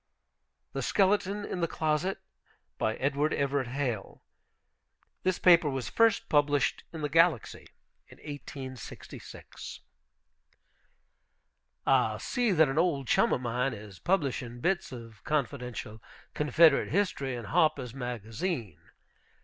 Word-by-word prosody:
THE - - -2
SKELETON 205 +1 +1
IN 180 - -4
THE 170 - +2
CLOSET 160 +5 0 0.6
BY 110 - 0
EDWARD 145 +3 0
EVERETT 140 -2 0
HALE 125 -5 -3 1.0
(This 185 -1 +1
paper 170 -4 +6
was 135 -2 -3
first 230 -2 +3
published 145 -2 +2
in 160 - -7
the 150 - 0
Galaxy, 165 -3 +2 0.4
in - - -16
1866.) 135 -3 -9 2.0
I 125 -5 +3
see 245 - 0
that 160 -4 +5
an 135 +3 0
old 150 -7 +1
chum - - +3
of - - +1
mine 125 +1 -1
is 100 -3 -11
publishing 135 -9 -1
bits 175 +4 0
of 115 -4 -10
confidential 125 -6 -3 0.3
Confederate 150 +1 +4
History 145 -8 0
in 120 -2 -6
Harper's 125 +2 +1
Magazine. 120 - -4
140 Hz, 115 wpm, -29 LUFS, 125-165 Hz, 2.0 s, paper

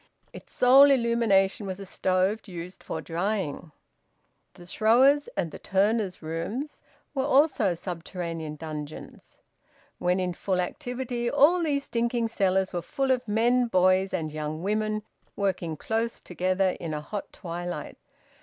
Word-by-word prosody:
Its - - -12
sole 270 +3 +7
illumination 230 -6 +2
was 190 0 -5
a 195 - -7
stove 190 +4 0
used 180 0 -8
for - - -5
drying. 175 -3 -3 0.8
The 175 - -13
`throwers'' 245 +10 +4
and 170 -4 -1
the - - -9
`turners'' 200 -2 0
rooms 200 - -4 0.3
were 270 -2 0
also 270 - +3
subterranean 170 -2 -5
dungeons. 155 -1 -8 0.6
When 180 +1 +1
in 180 -1 -1
full 185 +1 -1
activity 245 +4 -3
all 295 +6 +5
these 285 -4 0
stinking 235 -2 -1
cellars 190 -3 +1
were 175 - -1
full 270 +8 -1
of 250 -2 0
men, 240 +4 +3
boys, 185 -1 +3
and 160 -4 -2
young 155 +1 -4
women, 215 +1 -1 0.3
working 185 -5 -1
close 225 +5 -2
together 185 +2 0
in 160 -2 -4
a 150 - -4
hot 200 +7 -6
twilight. 175 -3 -6
195 Hz, 135 wpm, -27 LUFS, 175-235 Hz, 0.8 s, sole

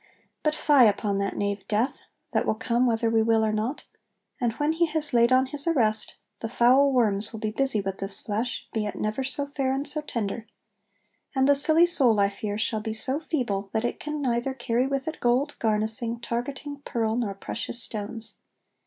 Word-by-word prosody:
But 305 0 +1
fye 290 -5 +5
upon 205 -1 +1
that 200 -1 -2
knave 200 -1 -2
Death, 220 +6 0 0.3
that - - 0
will - - +2
come 240 +3 +1
whether 230 0 +1
we 225 0 +3
will 225 0 +3
or 215 - +1
not! 220 +7 -2 0.6
And 240 -3 +1
when 295 +6 0
he 335 +1 +1
has 305 -3 -2
laid 235 +1 +4
on 260 +1 +5
his 290 +3 +1
arrest, 220 -9 +2 0.2
the 225 - -4
foul 255 +4 +4
worms 215 -5 +1
will 220 - -7
be 215 -1 -2
busy 265 -2 0
with 195 0 -4
this 195 0 -4
flesh, 225 +4 -3
be 215 -2 -1
it - - -5
never 215 +5 -2
so 275 +2 -2
fair 265 -2 0
and 280 +2 -3
so 305 +1 -1
tender; 230 -5 -4 0.9
and 265 0 +3
the 285 - +6
silly 315 +4 +6
soul, 260 -11 +3
I 200 0 +4
fear, 205 0 -4
shall 220 0 -1
be 220 0 -4
so 260 +6 -2
feeble, 235 -12 -2
that 220 +1 0
it - - -3
can 300 -1 -4
neither 245 +1 -1
carry 240 +1 0
with 275 +1 -2
it 320 - -4
gold, 255 +5 +1
garnassing, 225 +2 -1
targetting, 275 +4 -5
pearl, 225 -2 -1
nor 220 -5 -2
precious 230 +4 -4
stones." 220 +1 -6
235 Hz, 200 wpm, -26 LUFS, 215-275 Hz, 0.9 s, the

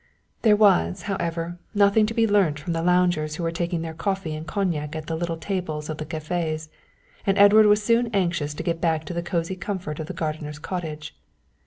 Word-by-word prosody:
There 215 -3 +5
was, 90 - +3
however, 170 -3 -3 0.2
nothing 205 +1 +4
to 225 - -4
be 230 - +4
learnt 200 -8 +3
from 170 +3 -3
the 165 - -1
loungers 175 -3 +2
who 170 - -4
were 165 - 0
taking 170 0 -2
their 160 -1 -5
coffee 190 -1 -2
and 155 +1 -6
cognac 165 -6 -2
at 155 -1 -5
the 160 - -3
little 165 0 -2
tables 160 -5 -3
of 155 - -6
the 155 - -5
cafés, 155 0 -3 0.5
and 195 -1 +1
Edward 210 +2 +7
was 210 0 +4
soon 235 +2 +3
anxious 170 -8 -1
to - - -5
get 170 -2 -2
back 160 -2 +1
to 175 - -5
the 170 - -2
cosy 170 +1 -2
comfort 185 -5 -4
of 155 - -4
the - - -5
gardener's 155 -2 -4
cottage. 155 -2 -5
170 Hz, 205 wpm, -24 LUFS, 155-195 Hz, 0.5 s, Edward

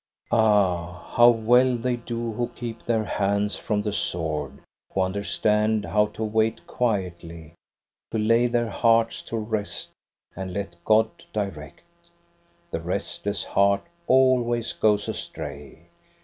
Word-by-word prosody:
Ah, 95 -6 +2
how 120 0 +8
well 120 +2 +4
they 125 +1 -1
do 120 -1 -4
who 120 +2 -1
keep 115 -2 -6
their 115 -2 +1
hands 100 0 0
from 105 -2 -2
the 105 - -1
sword, 80 -7 -2 0.3
who 95 - 0
understand 105 +3 +1
how 105 0 +2
to 105 +1 -6
wait 110 +1 0
quietly, 85 -8 -3 0.6
to 110 - -2
lay 115 +3 +3
their 120 -1 0
hearts 115 -1 +2
to 115 - -5
rest 110 -1 -3 0.4
and 95 -1 -5
let 100 -4 -4
God 110 0 +4 0.2
direct! 95 - -5 0.9
The - - -3
restless 100 +3 -2
heart 100 0 +2 0.2
always 125 -3 +3
goes 105 -1 +2
astray. 70 0 -7
105 Hz, 125 wpm, -25 LUFS, 95-115 Hz, 0.9 s, how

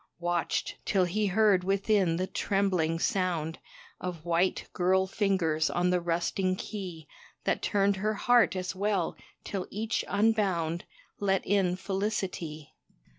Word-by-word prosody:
Watched, 175 0 -1
till 190 -3 +2
he 205 +4 0
heard 195 -1 +4
within 195 -2 +2
the 185 +2 0
trembling 185 -5 0
sound 165 -3 -1 0.4
Of 175 -3 -5
white, 175 +2 +1
girl 190 +1 +3
fingers 185 -6 +1
on 180 +1 +1
the 180 -1 +2
rusting 175 +2 0
key 185 -6 -6 0.4
That - - 0
turned 200 -1 +2
her 215 +3 0
heart 245 -2 +4
as 185 0 -3
well, 195 -3 0 0.3
till 195 -2 -4
each 220 +3 -2
unbound 195 -6 +1 0.3
Let 195 -1 +1
in 190 -2 +2
felicity. 190 -6 -3
185 Hz, 125 wpm, -29 LUFS, 175-200 Hz, 0.4 s, heard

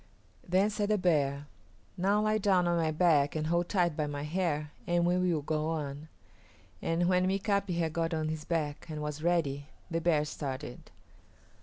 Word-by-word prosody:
Then 190 +4 +2
said 205 0 -1
the 215 - +3
bear, 145 -6 +1 0.5
"Now 200 +3 +2
lie 215 0 +2
down 190 -3 +3
on 175 - +2
my 160 -1 +1
back 155 -3 +3
and 155 0 -1
hold 170 +2 0
tight 175 -5 +1
by 150 -1 -1
my 145 -1 -4
hair 150 -2 -1 0.2
and 175 -1 +2
we 175 +1 +3
will 180 -5 +1
go 155 +1 -1
on"; 150 -2 -4 0.7
and 170 +1 +1
when 180 0 +3
Mika´pi 195 -1 0
had 165 -2 0
got 165 0 -1
on 155 -1 -1
his 155 -1 -4
back 155 -3 -2
and 155 -1 -4
was 150 0 -4
ready 150 -5 0 0.2
the 165 0 0
bear 155 -3 +2
started. 135 -3 -6
165 Hz, 180 wpm, -30 LUFS, 150-180 Hz, 0.7 s, the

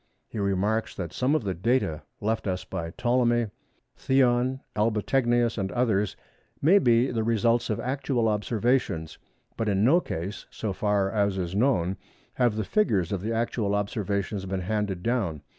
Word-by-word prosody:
He 110 - -6
remarks 100 +3 0
that 85 -3 -5
some 130 +4 +1
of 155 - 0
the 95 -2 -1
data 90 -5 0 0.2
left 110 0 -1
us 90 -1 -2
by 85 -3 -4
Ptolemy, 120 +2 +1 0.4
Theon, 130 0 +2
Albategnius 115 +2 +1
and 95 -1 -2
others 105 -6 +1 0.4
may 180 +8 +5
be 120 -4 +3
the 115 -2 -1
results 115 +1 +2
of 105 - -1
actual 130 -2 0
observations, 105 - 0 0.4
but 110 -2 0
in 100 0 +2
no 150 +10 +5
case, 95 - -5
so 105 -3 -4
far 100 -1 +1
as 100 -3 +1
is 90 -1 -3
known, 100 -5 +1 0.4
have 120 -4 +2
the 110 - -1
figures 100 - +1
of 100 -3 -2
the 110 +3 -2
actual 115 -3 0
observations 100 -1 -2
been 95 0 -2
handed 100 -1 -2
down. 100 - -1
110 Hz, 160 wpm, -26 LUFS, 95-120 Hz, 0.4 s, may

